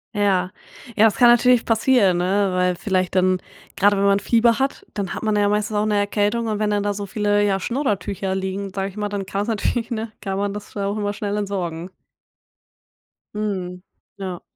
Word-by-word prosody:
Ja. 190 -3 +1 0.4
Ja, 215 - +5
das 220 - +3
kann 245 -2 +6
natürlich 240 0 +5
passieren, 225 -5 +3
ne? 190 +2 +1
Weil 180 0 +1
vielleicht 185 -1 -1
dann, 185 0 +2 0.3
grade 205 +1 +3
wenn 195 - +1
man 200 0 +4
Fieber 230 +3 +3
hat, 270 +1 -2
dann 200 -3 -3
hat - - -6
man 215 -1 +1
ja 205 0 +2
meistens 210 +1 -1
auch 210 +1 +1
‘ne 210 - +1
Erkältung 205 +3 0
und 215 -1 -2
wenn 215 - +1
dann 205 -1 0
da 205 0 0
so 200 0 -5
viele 205 +1 +1
ja, 195 -1 +1
Schnodder-Tücher 200 -6 -2
liegen, 190 +1 -3
sage 195 0 -2
ich 195 - -15
mal, 210 -1 -2
dann 200 -1 -4
kann's 200 +2 -3
natürlich, 230 +1 -1
ne? 225 -2 -4
Kann 195 -2 -3
man 200 0 -1
das 210 0 -9
auch 200 0 -1
immer 205 -1 -1
schnell 205 0 -3
entsorgen. 185 -4 -3 1.5
Mhm, 185 -4 -3 0.4
ja. 185 -3 -6
205 Hz, 200 wpm, -21 LUFS, 190-215 Hz, 1.5 s, kann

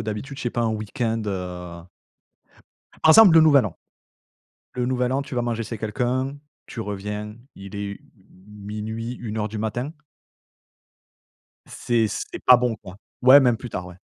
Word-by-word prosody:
d'habitude, 110 +6 -5
je - - -6
sais 120 - 0
pas 120 - -1
un 115 - +1
week-end, 110 +1 -2
heu 90 -3 -5 1.2
par 160 - +6
exemple 200 0 +8
le 165 - +8
nouvel 145 -6 +5
an. 95 - -7 1.0
Le 125 -1 -1
nouvel 125 0 0
an, 135 +2 0
tu 140 -2 -7
vas 120 - +1
manger 115 -1 -2
chez 115 +1 -6
quelqu'un, 130 +5 -2 0.3
tu - - -9
reviens, 105 0 -5 0.2
il 100 +1 -10
est, 100 - -4
u 100 0 -7 0.2
m 100 +2 -16
0:00-1:00 110 0 -4
du 110 - -6
matin. 120 +6 -3 1.8
C'est 115 -2 0
c'est - - -5
pas 125 - +8
bon, 120 -2 0
quoi. 95 -2 -13 0.2
Ouais, 130 +3 +9
même 125 -4 +3
plus 125 - -8
tard, 90 -4 -5
ouais. 90 - -11
115 Hz, 165 wpm, -23 LUFS, 105-125 Hz, 1.8 s, Ouais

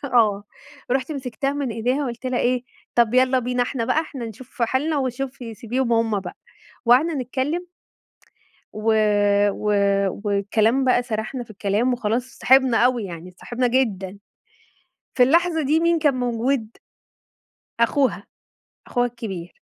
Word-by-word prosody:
آه. 220 -6 +2 0.5
رُحت 265 +3 0
مسكتها 270 0 -3
من 280 -4 -2
إيديها 250 +6 -1
قُلت 240 +1 -6
لها 255 -1 0
إيه: 250 0 +1 0.3
"طَب 235 0 +3
يالّا 255 0 +4
بينا 250 0 0
إحنا 245 -2 -2
بقى 310 - +2
إحنا 280 -6 -7
نشوف 235 +3 -8
حالنا 285 +6 +1
وشوفي 255 -2 -4
سيبيهم 235 +3 -2
هم 225 -3 +1
بقى." - - -8 0.5
وقعدنا 275 +8 +4
نتكلم. 275 +7 -2 1.1
و 215 +1 +1 0.6
و 210 +1 -4 0.6
والكلام 215 +5 +1
بقى 250 -1 +3
سرحنا 235 +2 -4
في 230 - -20
الكلام 210 +4 0
وخلاص 235 0 0
اتصاحبنا 260 -2 +4
أوي 245 -3 +2
يعني 170 -1 -8
اتصاحبنا 240 +7 -3
جدًا، 205 -6 -1 1.0
في 250 - +7
اللحظة 330 +4 +3
دي 300 +4 +2
مين 335 0 +2
كان 290 -4 +2
موجود؟ 245 -1 -1 1.1
أخوها، 265 +3 +2 0.6
أخوها 245 0 +1
كبير. 205 -8 -7
245 Hz, 135 wpm, -22 LUFS, 225-265 Hz, 1.1 s, في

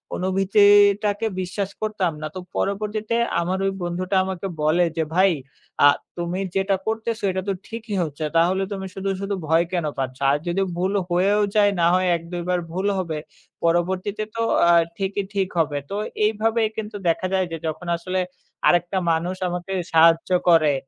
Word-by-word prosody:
অনুভূতিটাকে 205 +2 +4
বিশ্বাস 185 +2 -3
করতাম 210 -5 0
না। 155 - -3
তো 185 - -4 0.2
পরবর্তীতে 210 +3 -1 0.3
আমার 185 +2 -1
ওই 195 - +1
বন্ধুটা 180 +2 -2
আমাকে 190 0 -4
বলে 160 +4 +3
যে, 160 - +2
"ভাই 190 0 +5 0.5
আ - - +10 0.3
তুমি 175 +2 -2 0.2
যেটা 195 0 +2
করতেছো 225 0 -2
এটা 190 - -2
তো - - +2
ঠিকই 225 -2 -5
হচ্ছে। 155 0 -4
তাহলে 180 +3 +3
তুমি 195 -1 -4
শুধু, 195 0 -3
শুধু, 200 +1 -2
ভয় 165 +2 +4
কেন 175 -3 0
পাচ্ছ? 130 -1 -3
আর 145 - +2
যদি 175 +3 0 0.2
ভুল 190 +3 0 0.2
হয়েও 195 +4 +2
যায়, 205 -1 +5
না - - +4
হয় 185 0 +2
এক-দুইবার 175 +1 -3
ভুল 185 +3 -2
হবে। 165 -4 -3 0.5
পরবর্তীতে 185 +5 0
তো 230 - -1 0.3
আ 170 - +7 0.2
ঠিকই 195 0 -2
ঠিক 195 -2 0
হবে।" 145 -2 +1
তো 200 - -4 0.3
এইভাবেই 220 +1 +1
কিন্তু 215 -1 -5
দেখা 175 +3 +1
যায় 190 -1 +2
যে 165 - -3
যখন 160 +3 -5
আসলে 185 +2 -2 0.5
আরেকটা 175 +2 +2
মানুষ 170 +3 -1
আমাকে 180 +2 -4 0.2
সাহায্য 165 +2 +5 0.2
করে 155 -4 +5
185 Hz, 165 wpm, -23 LUFS, 170-200 Hz, 0.5 s, আ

